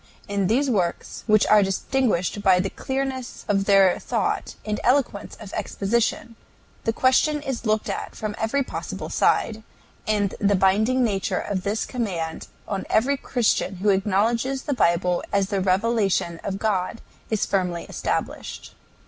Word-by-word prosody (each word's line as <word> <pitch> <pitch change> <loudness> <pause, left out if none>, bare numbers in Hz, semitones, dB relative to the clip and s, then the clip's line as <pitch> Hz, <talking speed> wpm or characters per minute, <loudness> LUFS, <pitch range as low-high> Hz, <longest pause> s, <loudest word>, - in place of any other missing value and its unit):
In 200 -2 0
these 260 +7 +2
works, 185 -9 -1
which 215 -1 +5
are 215 -1 +6
distinguished 200 -1 0
by 190 -2 +5
the 195 +1 -1
clearness 265 -1 -4
of 195 -1 +1
their 195 -2 +5
thought - - -2
and 210 -1 -2
eloquence 250 -5 +1
of 205 -3 -10
exposition, 225 +3 -1 0.5
the 225 - +2
question 260 +5 +3
is 265 -5 -4
looked 215 0 +1
at - - -4
from 215 -1 -4
every 250 +6 +1
possible - - -6
side, 220 -1 +1 0.5
and 205 -2 +1
the 205 0 +3
binding 215 +7 +3
nature 200 -5 0
of 195 -2 -2
this 205 +4 -1
command 180 -10 -3 0.2
on 195 -2 -3
every 255 +6 +3
Christian 240 -7 0
who 195 +3 0
acknowledges 225 +7 +1
the 290 - -1
Bible 175 -5 +2
as 200 -1 +1
the 200 -3 0
revelation 195 -3 +1
of 195 -1 -3
God 200 0 -1 0.3
is 220 -2 +1
firmly 180 -3 -1
established. - - -4
210 Hz, 150 wpm, -24 LUFS, 195-235 Hz, 0.5 s, are